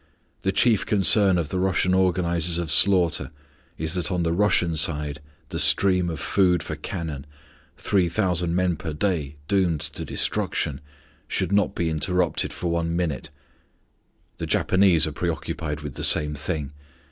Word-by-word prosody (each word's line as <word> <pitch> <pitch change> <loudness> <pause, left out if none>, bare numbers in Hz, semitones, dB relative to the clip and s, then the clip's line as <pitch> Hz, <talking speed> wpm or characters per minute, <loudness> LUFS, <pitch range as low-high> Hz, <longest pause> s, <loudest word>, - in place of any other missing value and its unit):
The 95 - 0
chief 110 +1 +3
concern 100 -1 +4
of 80 -4 -2
the 95 - -2
Russian 95 0 +1
organizers 90 -2 +1
of 85 -3 -3
slaughter 90 0 +3 0.5
is 80 +1 0
that 90 +1 -1
on 90 -2 -1
the 85 0 0
Russian 90 -3 +1
side 75 -2 +1 0.3
the - - -4
stream 90 -3 +4
of 80 -3 -5
food 90 -4 +1
for - - -5
cannon 80 -5 -6 0.5
three 95 -4 0
thousand 90 -2 -1
men 90 -2 0
per 80 -1 -6
day 75 -4 -2
doomed 90 -6 +1
to - - -4
destruction 70 -1 -2 0.5
should - - -2
not 100 0 +1
be 85 - -1
interrupted 85 +2 0
for 85 - -4
one 85 0 -1
minute. 85 -7 -3 1.1
The - - -4
Japanese 95 -4 +3
are 80 - -4
preoccupied 80 -2 -4
with 75 -2 -7
the - - -7
same 75 0 +4
thing. 75 -1 -4
85 Hz, 155 wpm, -23 LUFS, 80-95 Hz, 1.1 s, concern